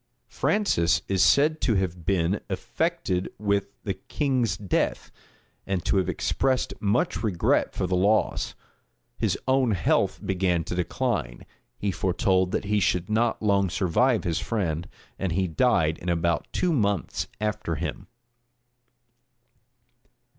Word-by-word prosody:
Francis 85 - +1
is 95 -2 +2
said 155 +3 +4
to 115 - +2
have 90 -3 -2
been 95 +1 +1
affected 115 - -2
with 100 -1 0 0.2
the 100 - -1
king's 120 - -1
death, 100 -2 -1 0.6
and 95 -3 -2
to - - +2
have 95 - +1
expressed 130 -1 0
much 100 0 0
regret 100 -7 +1
for - - -1
the 90 +1 0
loss. 100 +4 +1 0.6
His - - +1
own 130 -3 +3
health 90 - +1
began 90 -3 +1
to - - -5
decline: 60 -8 -2 0.3
he 100 - -1
foretold 95 0 +1
that 105 - -1
he 105 +1 +1
should 90 0 0
not 115 +1 +1
long 100 -2 +2
survive 105 +7 +2
his 85 -1 -1
friend;[*] 85 -7 -2 0.3
and 95 -4 -1
he 95 +2 +1
died 80 -4 +2
in 90 - -4
about 85 0 0
two 180 -2 +1
months 100 - 0
after 105 0 -2
him. - - -5
95 Hz, 130 wpm, -26 LUFS, 90-110 Hz, 0.6 s, said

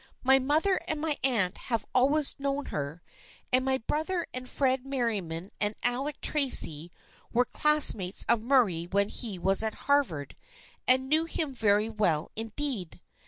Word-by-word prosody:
My 265 +1 +4
mother 310 +8 +3
and 310 - -2
my 310 -1 +1
aunt 220 -9 +2
have 230 -3 -1
always 280 +3 +3
known 280 +1 -3
her, 150 +4 -5 0.5
and 255 0 +3
my 265 0 0
brother 315 +8 -3
and 255 0 -6
Fred 260 -2 0
Merriam 230 -10 -3
and 195 +5 -4
Alec 270 +4 0
Tracy 175 - +3 0.4
were 245 +2 +2
classmates 260 -12 +2
of 235 -2 +2
Murray 225 -10 +1
when 200 +2 0
he 215 -6 -4
was 195 +3 +3
at 220 -1 -2
Harvard 240 - 0 0.5
and 260 +1 +4
knew 310 +3 +2
him 315 -3 -2
very 210 -3 +1
well 180 -8 -1
indeed. 225 - -4
250 Hz, 150 wpm, -27 LUFS, 200-280 Hz, 0.5 s, My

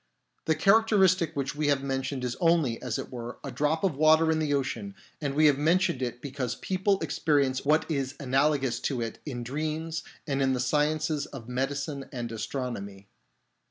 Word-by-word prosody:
The 160 - +2
characteristic 195 -2 +4
which 140 -1 -2
we 150 0 0
have 140 -2 +2
mentioned 135 -1 -2
is 125 -1 -2
only, 165 -9 +2
as 125 -3 -2
it - - -6
were, 120 -1 -6
a 140 - -5
drop 150 +8 0
of 185 -7 +1
water 155 +2 +5
in 160 - +1
the 155 -2 0
ocean, 145 +8 -2 0.3
and 140 -2 -2
we 155 +1 +5
have 145 -2 +5
mentioned 165 -3 +2
it 120 -1 -4
because 130 -3 -3
people 190 +1 0
experience 140 -4 +1
what 155 +2 +3
is 140 -3 -2
analogous 135 -2 +1
to 130 0 -2
it 115 -1 -4
in 120 -4 -4
dreams 155 +5 -3 0.2
and 140 -2 -1
in 135 -1 +2
the 125 - -1
sciences 150 +3 0
of 120 -5 -10
medicine 135 +2 -3
and 120 -2 -4
astronomy. 110 -4 -5
140 Hz, 180 wpm, -28 LUFS, 130-155 Hz, 0.3 s, water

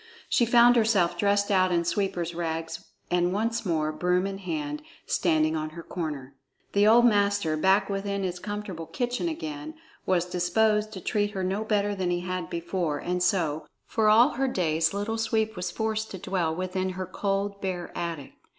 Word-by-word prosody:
She 240 - +3
found 240 +1 +6
herself 205 -7 +3
dressed 200 +2 +1
out 185 -1 +3
in 170 -1 +1
sweeper's 180 -3 -1
rags, 165 -1 -4 0.3
and 175 0 +2
once 225 +3 -1
more, 155 -2 0
broom 180 +3 +1
in 195 0 -4
hand, 150 -5 -4 0.2
standing 155 -2 +2
on 155 0 -2
her 170 - -7
corner. 150 -7 -5 0.4
The 205 +1 +4
old 235 +2 +7
master, 200 -7 +2
back 190 +6 +3
within 200 0 -2
his 180 -1 -3
comfortable 205 -5 -5
kitchen 245 +6 -2
again, 310 -1 -6 0.3
was 180 -2 +2
disposed 210 +5 +1
to 190 - -7
treat 205 0 0
her 190 -2 -2
no 195 +3 -1
better 205 -1 +1
than 185 -3 -2
he 175 0 0
had 180 0 -4
before; 170 -2 -2
and 180 +4 -2
so, 175 -4 0 0.2
for 220 -1 +2
all 230 +5 +7
her 270 -1 -1
days, 160 -8 +1
Little 205 +3 -2
Sweep 220 -1 0
was 180 -1 -3
forced 220 0 -2
to 190 - -6
dwell 175 -3 -1
within 185 +1 -2
her 185 - -3
cold, 200 +2 -2
bare 180 -2 -4
attic. 165 -5 -4
190 Hz, 180 wpm, -27 LUFS, 170-210 Hz, 0.4 s, old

